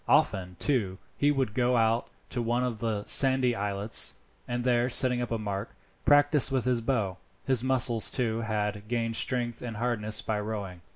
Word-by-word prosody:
Often, 90 -1 +2
too, 100 - 0 0.2
he 145 - +2
would 135 -7 0
go 125 +1 +2
out 115 +1 +1 0.2
to 120 - -2
one 120 +2 0
of 120 -4 -3
the 110 -3 -2
sandy 130 -2 +4
islets, 100 +1 +1 0.3
and 120 0 -3
there 120 0 +2
setting 125 -1 +1
up 120 - -3
a 115 - -1
mark, 100 -1 -5 0.3
practise 145 -2 +5
with 130 -3 0
the 125 -2 0
bow. 110 -7 -1 0.3
His 130 -3 +1
muscles 125 -3 +2
too, 115 -3 -1
had 105 -2 -3
gained 115 -1 -2
strength 120 -2 -1
and 115 -3 -6
hardness 110 -2 0
by 110 -1 -2
rowing. 100 -4 -5
115 Hz, 175 wpm, -28 LUFS, 105-125 Hz, 0.3 s, practise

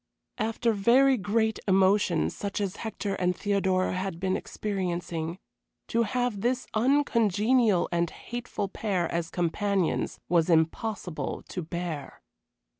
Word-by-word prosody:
After 225 +1 +1
very 250 +7 +5
great 220 +1 0
emotion 190 -2 +3
such 200 0 -4
as 200 -2 -2
Hector 215 -3 -3
and 180 -1 0
Theodora 190 -2 +1
had 185 -2 -3
been 190 0 0
experiencing, 175 -4 -3 0.5
to 230 - +2
have 230 -2 -1
this 250 +2 0
uncongenial 230 -4 +3
and 170 -1 +1
hateful 240 -1 -5
pair 190 -4 -1
as 170 -1 -2
companions 185 +1 0
was 170 0 +2
impossible 170 +2 0
to 180 - -4
bear. 170 -3 -5
195 Hz, 115 wpm, -28 LUFS, 175-220 Hz, 0.5 s, very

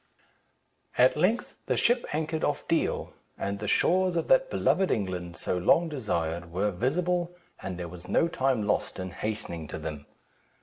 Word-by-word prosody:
At 125 +1 +6
length 185 +10 +1
the - - +1
ship 240 +1 +3
anchored 155 +1 -1
off 145 - -1
Deal, 165 - 0 0.2
and 100 0 -3
the 105 - -4
shores 185 - +3
of 165 - -1
that - - +5
beloved 190 - +2
England, 90 -5 -2
so 90 - -1
long 165 - +4
desired, 85 - -2
were 100 +4 0
visible, 175 - 0 0.3
and 95 -2 -5
there 90 -1 -4
was 90 +1 -10
no 165 - +3
time 135 -9 0
lost 105 - 0
in 95 -1 -4
hastening 105 -8 -4
to - - -5
them. 75 -2 -6
110 Hz, 165 wpm, -28 LUFS, -, 0.3 s, At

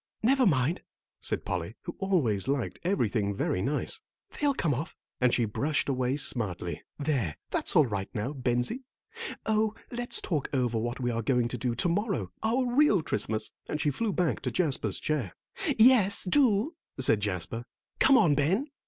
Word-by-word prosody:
"Never 260 +1 +4
mind," 150 +1 +1 0.4
said - - -1
Polly, - - -3
who - - -6
always 140 - +1
liked 135 -3 -1
everything 110 - 0
very 90 - -1
nice, 150 - -1 0.3
"they'll 285 -2 0
come 160 - +1
off," 145 +6 -4 0.2
and 125 -1 +3
she 120 - +2
brushed 145 +8 -1
away 130 0 0
smartly. 100 - -2 0.2
"There, 135 - -1
that's - - +2
all 155 - +6
right 100 -4 -3
now, 115 +6 -3
Bensie. 125 - -1 0.6
Oh, 220 0 +1 0.2
let's 245 0 +2
talk 155 -6 -2
over 120 -4 +1
what 120 +2 -3
we 125 -1 0
are 115 0 -1
going 120 0 +1
to 125 - -3
do 120 -1 -1
to 120 - +1
morrow, 175 - -1
our 245 +4 +1
real 245 - +3
Christmas," 110 -4 -1 0.2
and 150 - -2
she 150 - +1
flew 215 +10 -1
back 180 -4 0
to - - -3
Jasper's 135 - 0
chair. 135 - -2 0.4
"Yes, 220 -4 +6
do," 230 - +3 0.3
said 125 -5 +3
Jasper. 105 +3 -2 0.3
"Come 270 -1 +6
on, 160 -10 +4
Ben." 180 - +1
140 Hz, 170 wpm, -28 LUFS, -, 0.6 s, all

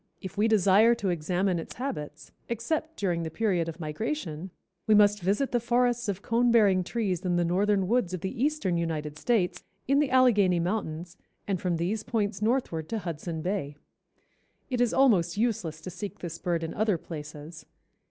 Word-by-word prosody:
If 190 -1 -8
we 210 +2 +2
desire 215 +2 +5
to 205 -5 -2
examine 175 +2 0
its 165 - -8
habits, 155 - -6 0.2
except 310 +8 -2
during 175 -4 0
the 165 - -3
period 180 -3 0
of 165 - -8
migration, 170 - -4 0.4
we 215 - +6
must 205 -1 +5
visit 205 +10 0
the 240 - +2
forests 240 0 +1
of 200 0 -3
cone 240 +1 +2
bearing 200 -5 +4
trees 195 -4 -2
in 180 -2 0
the 175 0 +2
northern 195 +2 +1
woods 225 -4 +1
of 185 -2 -4
the 225 +6 -3
eastern 285 - 0
United 155 -2 -3
States, 215 -7 0 0.2
in 275 +2 +4
the 295 -2 +2
Allegheny 215 -9 +4
mountains 175 -2 -3 0.3
and 195 -3 -1
from 180 -2 0
these 190 +6 -1
points 210 -3 -2
northward 210 -9 0
to 225 - -1
Hudson 165 -3 -5
Bay. 180 -7 -2 1.0
It 250 -1 0
is 245 - +3
almost 200 -10 +3
useless 210 -9 -1
to 185 - -7
seek 195 +1 -6
this 165 -2 -7
bird 170 -2 -1
in 165 - -4
other 210 -3 +1
places. 155 0 -9
195 Hz, 180 wpm, -28 LUFS, 170-225 Hz, 1.0 s, we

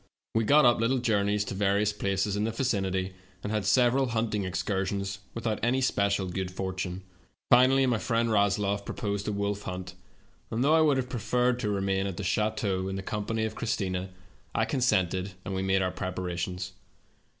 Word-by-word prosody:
We 115 0 +2
got 145 +3 +6
up 120 -2 +5
little 115 +4 +2
journeys 105 -4 +1
to - - -4
various 100 +1 +1
places 100 0 -1
in 105 - 0
the 110 - 0
vicinity, 95 -6 -1 0.3
and 105 - -3
had 105 -2 -1
several 125 +4 +4
hunting 110 -3 -1
excursions, 95 +1 -2 0.2
with 115 - -6
out 110 -2 0
any 125 +3 +2
special 100 -6 +1
good 95 +1 -3
fortune. 95 0 -4 0.5
Finally 130 +2 +6
my 120 -4 +1
friend 115 0 0
Rasloff 100 -1 +2
proposed 100 0 -3
a - - 0
wolf 100 0 -2
hunt, 90 -1 -6 0.6
and 115 +3 -1
though 150 +3 +4
I 160 - +5
would 150 -3 +4
have 130 -1 -1
preferred 125 +1 0
to 110 -4 -1
remain 95 -1 0
at 95 - -5
the 100 - -4
chateau 100 -1 0
in 95 - -3
the 95 - -4
company 110 +2 -2
of 110 - -3
Christina, 95 -5 -2 0.5
I 110 - +2
consented, 100 -7 +1
and 95 - -3
we 95 - -1
made 95 0 +2
our 90 - 0
preparations. 90 0 -4
100 Hz, 185 wpm, -28 LUFS, 95-115 Hz, 0.6 s, got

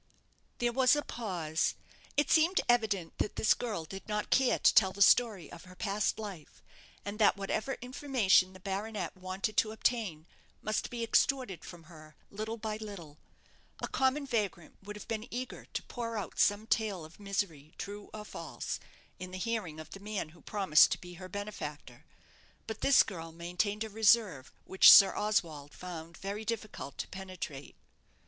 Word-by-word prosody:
There 240 0 +1
was 260 +2 +5
a 295 - -1
pause. 175 -9 -2 0.4
It 290 - +2
seemed 335 +4 +4
evident 215 -8 +1
that 210 - -1
this 215 - +4
girl 210 -9 -4
did 195 +4 -9
not 210 -1 -2
care 265 -2 +4
to - - +5
tell 190 -3 +5
the 200 - -11
story 210 -8 +4
of 170 - -11
her 185 0 -14
past 200 +2 -1
life, 200 -8 -9 0.4
and 205 +2 -5
that 205 -2 +5
whatever 215 +6 -2
information 245 -8 +2
the 185 - -13
baronet 200 +2 -4
wanted 185 +3 -4
to 215 - +3
obtain, 215 -8 -1 0.3
must 215 0 -2
be 235 -1 -4
extorted 245 -3 +1
from 175 -2 -11
her 155 -2 -15 0.2
little 220 +3 -4
by 215 -1 -4
little. 190 -9 -9 0.6
A - - -3
common 265 +2 +1
vagrant 205 -9 -2
would 210 +1 -8
have 210 - -10
been 220 -1 -3
eager 255 +2 -5
to - - -5
pour 230 -2 -5
out 205 - -5
some 205 +1 +3
tale 210 -7 0
of 160 +5 -16
misery, 190 -7 -3
true 205 0 -7
or 210 -1 -8
false, - - -5 0.4
in 185 - -6
the 185 - -7
hearing 185 -6 -3
of 155 - -10
the 195 - -8
man 205 -5 -4
who 170 - -18
promised 190 -7 +4
to - - -4
be 180 0 -10
her 185 - -8
benefactor; 150 - -7 0.6
but 220 -1 -6
this 275 - +6
girl 165 -4 -7
maintained 180 +6 -2
a 220 - -6
reserve 210 - +3
which 190 - +8
Sir 195 -2 +9
Oswald 160 -9 -1
found 170 -2 -8
it - - -17
very 200 +2 -4
difficult 215 -10 -5
to - - -4
penetrate. 185 -8 -7
200 Hz, 175 wpm, -31 LUFS, 180-220 Hz, 0.6 s, Sir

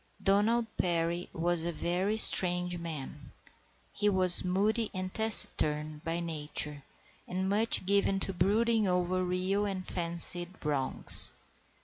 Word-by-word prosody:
Donald 210 +4 +1
Perry 170 0 -2
was 170 0 -2
a 170 - -3
very 180 +6 -3
strange 180 -4 +4
man. 150 -3 -8 0.6
He 210 0 -1
was 185 -2 +2
moody 210 +5 -2
and 185 0 -6
taciturn 155 -8 +1
by 165 +1 -4
nature, 150 -3 -2 0.5
and 185 +1 -4
much 210 0 +3
given 200 0 +1
to 195 - -5
brooding 215 +4 0
over 180 0 -2
real 185 +3 -2
or 195 - -4
fancied 175 0 +2
wrongs. 140 -3 +3
180 Hz, 120 wpm, -28 LUFS, 170-200 Hz, 0.6 s, strange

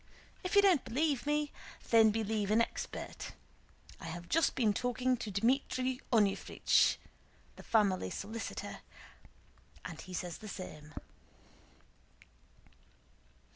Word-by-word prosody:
If 365 +2 -2
you 405 - +7
don't 365 -8 +5
believe 280 +3 0
me, 295 0 +1 0.4
then 225 -1 +7
believe 215 -1 -1
an 215 +2 +4
expert. 230 - -3 0.7
I - - -9
have 175 +1 -6
just 330 - +2
been 220 -5 +3
talking 250 +2 +1
to 220 - -5
Dmítri 255 +4 +1
Onúfrich" 210 -5 +3 0.6
(the - - -11
family 200 - +2
solicitor) 220 - -5 1.1
"and 165 -3 -7
he 185 - -10
says 175 -1 -4
the 215 - -9
same." 155 -6 -8
225 Hz, 110 wpm, -33 LUFS, 200-255 Hz, 1.1 s, you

